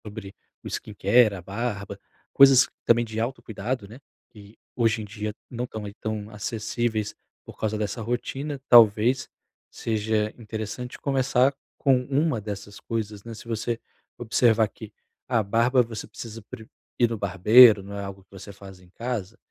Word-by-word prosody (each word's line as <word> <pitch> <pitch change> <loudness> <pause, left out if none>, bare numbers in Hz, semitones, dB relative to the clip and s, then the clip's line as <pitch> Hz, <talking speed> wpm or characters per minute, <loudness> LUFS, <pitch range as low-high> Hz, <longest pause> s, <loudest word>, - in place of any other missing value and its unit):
Sobre 105 -2 -8 0.3
o - - -7
skincare, 105 +1 +2
a 95 - -8
barba, 100 +1 -4 0.3
coisas 135 -1 +7 0.2
também 120 0 +4
de 110 -1 -5
autocuidado, 115 -2 -4
né, 115 +6 -12 0.3
que 105 -2 -15 0.2
hoje 115 -2 +1
em - - -6
dia 105 +1 -5 0.2
não 120 0 -4
estão 110 -3 -7
aí 100 - -7
tão 110 -1 -5
acessíveis 110 0 -2 0.3
por - - -12
causa 110 0 -1
dessa 105 +1 -3
rotina, 135 +5 -3
talvez 120 +3 +5 0.4
seja 110 -1 -1
interessante 110 +2 -6
começar 135 -1 +2 0.2
com 130 -2 +3
uma 140 -3 0
dessas 100 0 -7
coisas, 105 -3 -4
né, 115 - -8
se 110 - -12
você 115 +1 -2 0.4
observar 115 -1 +3
que 110 0 -11 0.4
a 120 -3 +2
barba 115 +5 +3
você 115 -2 -7
precisa 110 +1 -9
pre 110 -3 -9 0.3
ir 120 -2 +4
no 115 - -3
barbeiro, 105 +3 +7
não 100 +1 -8
é 100 - -4
algo 100 -1 -8
que - - -43
você 100 +1 -10
faz 95 -1 -13
em 90 -1 -20
casa, 115 0 -5
110 Hz, 160 wpm, -25 LUFS, 105-120 Hz, 0.4 s, coisas